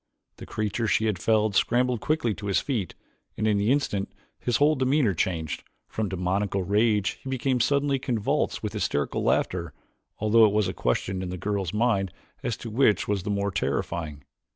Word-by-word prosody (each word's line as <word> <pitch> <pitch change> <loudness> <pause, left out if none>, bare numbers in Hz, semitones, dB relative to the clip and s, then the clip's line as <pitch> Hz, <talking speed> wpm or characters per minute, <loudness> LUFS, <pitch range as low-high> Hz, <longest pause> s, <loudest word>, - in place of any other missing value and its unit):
The - - -10
creature 110 +2 -2
she 110 - +2
had 105 -5 0
felled 110 0 +2
scrambled 125 +1 +2
quickly 155 -8 0
to 100 0 -7
his 100 - +2
feet 115 -10 -3 0.4
and 110 - -1
in 105 -2 +3
the 105 +4 +2
instant 105 -9 0 0.3
his 120 -2 0
whole 150 +2 +4
demeanor 130 -5 +2
changed. 80 -2 -2 0.3
From 110 -2 -3
demoniacal 95 +1 -1
rage 105 +1 +1
he 135 - -6
became 130 0 0
suddenly 140 +3 +2
convulsed 120 -5 -1
with - - -3
hysterical 70 -1 -1
laughter 85 -4 0 0.4
although 110 +2 +5
it 105 - +2
was 105 -2 +2
a 90 - -3
question 95 +10 -1
in 95 - -4
the 90 - -4
girl's 100 -2 -2
mind 105 -4 +1 0.3
as 115 - -2
to 115 - -7
which 110 -2 +3
was 100 -2 0
the 105 - -5
more 100 0 0
terrifying. 75 0 -2
105 Hz, 180 wpm, -26 LUFS, 95-120 Hz, 0.4 s, although